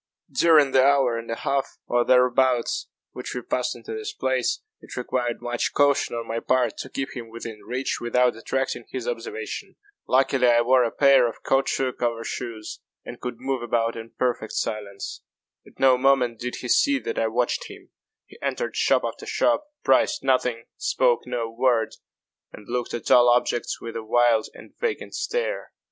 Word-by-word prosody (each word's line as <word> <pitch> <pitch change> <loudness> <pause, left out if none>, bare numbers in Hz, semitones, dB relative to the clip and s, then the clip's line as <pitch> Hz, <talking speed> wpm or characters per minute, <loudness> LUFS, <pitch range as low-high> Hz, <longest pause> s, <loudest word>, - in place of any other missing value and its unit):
During 155 -5 +5
the 130 0 +5
hour 135 -3 +4
and 115 0 -6
a 115 - -1
half, 135 +3 -2
or 120 0 +2
thereabouts, 125 0 +2 0.2
which - - -7
we - - -4
passed - - -1
in - - -13
this 440 -1 -5
place, - - -1 0.2
it - - -11
required 125 -1 -2
much 120 0 -1
caution 140 -4 +2
on 115 -1 -4
my 115 +1 -2
part 125 -2 +1
to 130 - -6
keep 135 +2 -4
him 120 -3 -7
within 115 -2 -8
reach 125 +3 -2
without 125 0 +2
attracting 135 +4 -2
his - - -5
observation. 445 -3 -5 0.3
Luckily 130 -1 +3
I 120 -1 +5
wore 125 +1 +4
a 115 - +1
pair 135 -1 +5
of 115 - -8
caoutchouc 135 -1 0
over 115 -1 0
shoes, 115 -3 -6 0.3
and - - -9
could 125 -1 -4
move 130 -1 -2
about 115 -1 0
in 115 0 -8
perfect 120 -3 -1
silence. 100 -2 -4 0.5
At - - -19
no 130 -1 +5
moment 125 -4 +3
did 125 0 -4
he 125 - -5
see 280 - +4
that 450 +9 -3
I - - +2
watched - - -1
him. - - -13 0.3
He - - -17
entered - - -2
shop - - +3
after 435 - -5
shop, 305 -9 +1 0.2
priced 135 -1 +3
nothing, 125 -3 +1
spoke 125 -1 +1
no 120 -2 -2
word, 115 0 +1 0.6
and 105 -1 -13
looked 120 0 -2
at 120 - -4
all 120 0 +7
objects 120 0 +1
with 115 - -7
a 115 - -3
wild 115 0 +3
and - - -14
vacant 470 -3 -2
stare. - - -3
125 Hz, 180 wpm, -24 LUFS, 115-135 Hz, 0.6 s, all